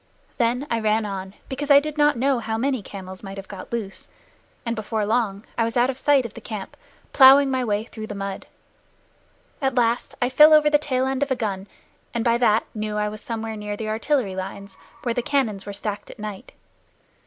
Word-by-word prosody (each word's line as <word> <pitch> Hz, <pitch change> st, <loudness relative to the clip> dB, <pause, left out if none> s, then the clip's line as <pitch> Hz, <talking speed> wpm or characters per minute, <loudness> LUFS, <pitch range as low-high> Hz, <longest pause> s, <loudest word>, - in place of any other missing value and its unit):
Then 245 Hz, +3 st, +1 dB
I 230 Hz, -, +1 dB
ran 215 Hz, 0 st, +1 dB
on, 195 Hz, -1 st, -6 dB
because 280 Hz, +2 st, -4 dB
I 280 Hz, -1 st, +9 dB
did 300 Hz, +1 st, -5 dB
not 295 Hz, -3 st, +3 dB
know 265 Hz, +1 st, +2 dB
how 220 Hz, -1 st, -3 dB
many 260 Hz, 0 st, 0 dB
camels 190 Hz, -2 st, -9 dB
might 195 Hz, -1 st, -8 dB
have 195 Hz, -, -8 dB
got 195 Hz, -2 st, -9 dB
loose, 215 Hz, -5 st, -5 dB, 0.6 s
and 230 Hz, 0 st, -1 dB
before 220 Hz, -1 st, -2 dB
long 215 Hz, -2 st, 0 dB
I -, -, +4 dB
was 230 Hz, +1 st, -1 dB
out 245 Hz, +2 st, +3 dB
of 255 Hz, -, -11 dB
sight 280 Hz, -3 st, +3 dB
of 225 Hz, -, -7 dB
the -, -, -10 dB
camp, 210 Hz, -4 st, -7 dB, 0.4 s
plowing 270 Hz, 0 st, +8 dB
my 260 Hz, -1 st, 0 dB
way 210 Hz, -2 st, 0 dB
through 220 Hz, -1 st, -8 dB
the 205 Hz, -, -6 dB
mud. 195 Hz, -1 st, -5 dB, 1.1 s
At 265 Hz, -2 st, 0 dB
last 235 Hz, -1 st, +1 dB
I 245 Hz, -, +2 dB
fell 300 Hz, +4 st, +7 dB
over 300 Hz, -1 st, +4 dB
the 295 Hz, -, +5 dB
tail 260 Hz, -3 st, 0 dB
end 265 Hz, 0 st, -1 dB
of 285 Hz, -, +1 dB
a 260 Hz, -, +1 dB
gun, 200 Hz, -4 st, -3 dB, 0.5 s
and 230 Hz, 0 st, -1 dB
by 235 Hz, 0 st, +3 dB
that 225 Hz, -2 st, +3 dB
knew 215 Hz, -1 st, -3 dB
I 210 Hz, 0 st, 0 dB
was 215 Hz, 0 st, -9 dB
somewhere 225 Hz, -1 st, -4 dB
near 210 Hz, -1 st, -5 dB
the 215 Hz, 0 st, -4 dB
artillery 225 Hz, -2 st, 0 dB
lines 195 Hz, +1 st, -6 dB, 0.3 s
where 240 Hz, -, 0 dB
the 245 Hz, -, 0 dB
cannon 240 Hz, -6 st, 0 dB
were -, -, -4 dB
stacked 205 Hz, 0 st, -5 dB
at -, -, -11 dB
night. 210 Hz, -2 st, -8 dB
225 Hz, 215 wpm, -23 LUFS, 210-260 Hz, 1.1 s, I